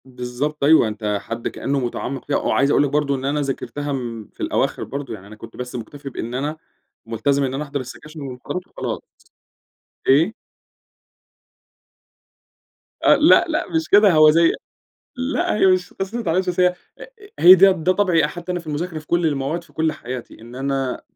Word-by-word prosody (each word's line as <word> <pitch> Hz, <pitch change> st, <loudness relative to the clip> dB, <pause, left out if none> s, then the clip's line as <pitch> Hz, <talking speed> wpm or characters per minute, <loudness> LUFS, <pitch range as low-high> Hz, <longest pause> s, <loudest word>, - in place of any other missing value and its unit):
بالضبط 130 Hz, +4 st, -4 dB
أيوه، 150 Hz, -5 st, +6 dB
أنت 105 Hz, -1 st, -2 dB
حد 115 Hz, 0 st, -5 dB
كأنّه 140 Hz, 0 st, -2 dB
مُتعمِّق 130 Hz, +1 st, -4 dB
فيها 145 Hz, -, 0 dB
وعايز 140 Hz, +2 st, +1 dB
أقول -, -, +4 dB
لك 145 Hz, -, 0 dB
برضه 145 Hz, 0 st, 0 dB
إن 130 Hz, 0 st, -5 dB
أنا 145 Hz, +2 st, 0 dB
ذاكرتها 145 Hz, +1 st, -4 dB
م 115 Hz, -5 st, -5 dB
في -, -, -7 dB
الأواخر -, -, -1 dB
برضه، 135 Hz, -3 st, -6 dB
يعني 100 Hz, -2 st, -10 dB
أنا 105 Hz, -, -12 dB
كنت 105 Hz, -, -12 dB
بس 125 Hz, 0 st, -6 dB
مُكتفي 140 Hz, +4 st, -7 dB
بإن 120 Hz, -2 st, -6 dB
أنا 145 Hz, +5 st, -3 dB, 0.5 s
ملتزم 135 Hz, +5 st, 0 dB
إن 130 Hz, -1 st, -2 dB
أنا 140 Hz, +3 st, -2 dB
أحضَر 140 Hz, -1 st, -4 dB
السكاشن 150 Hz, +5 st, -10 dB
والمحاضرات 135 Hz, +7 st, -6 dB
وخلاص. -, -, -5 dB, 1.1 s
إيه؟ 160 Hz, +10 st, +4 dB, 2.7 s
أ -, -, +6 dB
لأ، -, -, +6 dB
لأ، -, -, -1 dB
مش 325 Hz, -1 st, -1 dB
كده، 205 Hz, -1 st, +6 dB
هو 155 Hz, -1 st, +7 dB
زي 165 Hz, +1 st, +4 dB, 0.7 s
لأ، 285 Hz, +6 st, -1 dB
هي 200 Hz, -, +4 dB
مش 185 Hz, -1 st, +2 dB
قِصّة 195 Hz, +4 st, -5 dB
ما 240 Hz, -, -2 dB
اتعلّمتش، 185 Hz, 0 st, 0 dB
بس 180 Hz, 0 st, 0 dB
هي 180 Hz, -, +6 dB
أ 180 Hz, -, -12 dB
أ -, -, -8 dB, 0.3 s
هي 180 Hz, +2 st, +10 dB
ده 195 Hz, +1 st, +7 dB
ده 180 Hz, 0 st, +1 dB
طَبعي 180 Hz, -5 st, +2 dB
حتى 175 Hz, +3 st, -6 dB
أنا 180 Hz, -, -2 dB
في 170 Hz, -, -18 dB
المذاكرة 160 Hz, +2 st, -3 dB
في 155 Hz, -, -13 dB
كل 170 Hz, -1 st, +1 dB
المواد 150 Hz, +3 st, -2 dB
في 155 Hz, -, -23 dB
كل 160 Hz, +1 st, 0 dB
حياتي، 125 Hz, -6 st, -8 dB
إن 120 Hz, +2 st, -12 dB
أنا 135 Hz, -1 st, -2 dB
145 Hz, 185 wpm, -21 LUFS, 130-170 Hz, 2.7 s, هي